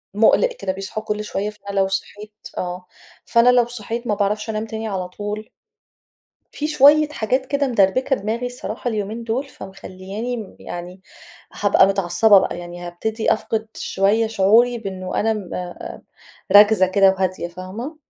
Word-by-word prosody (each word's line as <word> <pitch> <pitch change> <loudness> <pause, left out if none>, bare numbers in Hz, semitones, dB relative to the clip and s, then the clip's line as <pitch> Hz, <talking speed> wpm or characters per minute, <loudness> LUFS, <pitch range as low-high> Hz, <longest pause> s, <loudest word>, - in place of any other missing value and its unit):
مُقلِق 230 - +4
كده 190 - -1
بيصحوا 195 +3 -5
كل 210 0 -3
شوية، 210 0 -3
فأنا 200 -1 -5
لو 190 - +3
صحيت 210 +2 -5 0.2
آه، 180 0 -4 0.4
فأنا 235 +1 +4
لو 245 -1 +5
صحيت 235 +1 -5
ما 210 - +1
باعرفش 210 +2 -1
أنام 215 +1 -3
تاني 220 0 -5
على 185 -3 -3
طول. 210 +3 -6 1.0
في 300 - -3
شوية 300 +1 +5
حاجات 260 -1 -1
كده 280 0 0
مدربكة 245 +5 +2
دماغي 225 +4 -3
الصراحة 245 0 -5
اليومين 215 +2 -4
دول، 255 +5 -2
فمخلّياني 195 +4 -7
م 215 -4 -9
يعني 175 +2 -8 0.5
هابقى - - +4
متعصبة 195 +2 +4
بقى, 175 - -2
يعني 175 0 -8
هابتدي 220 +6 -1
أفقد 220 0 -2
شوية 205 +4 +1
شعوري 225 +3 +3
بإنه 190 -3 -4
أنا 225 +1 +2
م 205 -4 -6
آآ، 180 -1 -7 0.5
راكزة 205 -2 +7
كده 195 +1 +4
وهادية، 185 -2 -2
فاهمة؟ 195 - -7
210 Hz, 155 wpm, -21 LUFS, 190-230 Hz, 1.0 s, راكزة